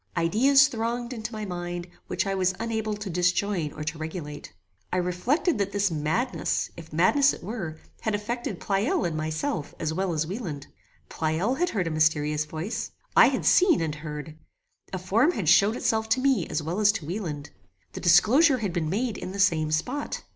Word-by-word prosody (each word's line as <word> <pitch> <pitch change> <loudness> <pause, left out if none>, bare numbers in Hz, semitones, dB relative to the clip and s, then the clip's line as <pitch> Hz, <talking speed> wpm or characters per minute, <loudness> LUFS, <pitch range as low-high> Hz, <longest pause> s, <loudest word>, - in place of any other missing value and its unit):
Ideas 260 +12 +5
thronged 240 -1 -3
into 225 -1 -5
my 215 -2 -5
mind 175 -1 -4 0.2
which - - -1
I 195 - -1
was 185 -1 +1
unable 220 -2 -2
to 210 0 -7
disjoin 180 -1 0
or 155 - -6
to 160 +1 -4
regulate. 155 -2 -6 0.4
I 185 - 0
reflected 205 - 0
that 200 0 -1
this 200 -2 +1
madness, 160 - -1
if 165 -1 -11
madness 270 - +4
it - - -10
were, 175 -6 -5 0.2
had 220 -2 -1
affected 235 +4 -4
Pleyel 220 - 0
and 165 - -2
myself 155 - -3
as 160 -1 -1
well 190 +2 -1
as 155 -1 0
Wieland. 170 - -5 0.4
Pleyel 170 - -1
had 355 0 +2
heard 195 - -1
a 165 - -2
mysterious 150 -1 +1
voice. 160 +9 -4 0.3
I - - +8
had - - -1
seen 360 -5 +5
and 160 -2 -1
heard. 150 0 -7 0.6
A 190 - -2
form 215 - +2
had 190 - -3
showed 205 +8 +5
itself 220 -2 0
to 225 - +3
me 270 -1 +2
as 155 - -2
well 170 +6 -3
as 210 -1 +5
to 195 -9 -5
Wieland. 160 -5 -5 0.4
The - - -6
disclosure 255 - +5
had 205 -7 -3
been 165 -3 -1
made 225 +4 -1
in 185 - -6
the 200 - -6
same 160 -5 +3
spot. 250 - -2
190 Hz, 190 wpm, -26 LUFS, 160-225 Hz, 0.6 s, I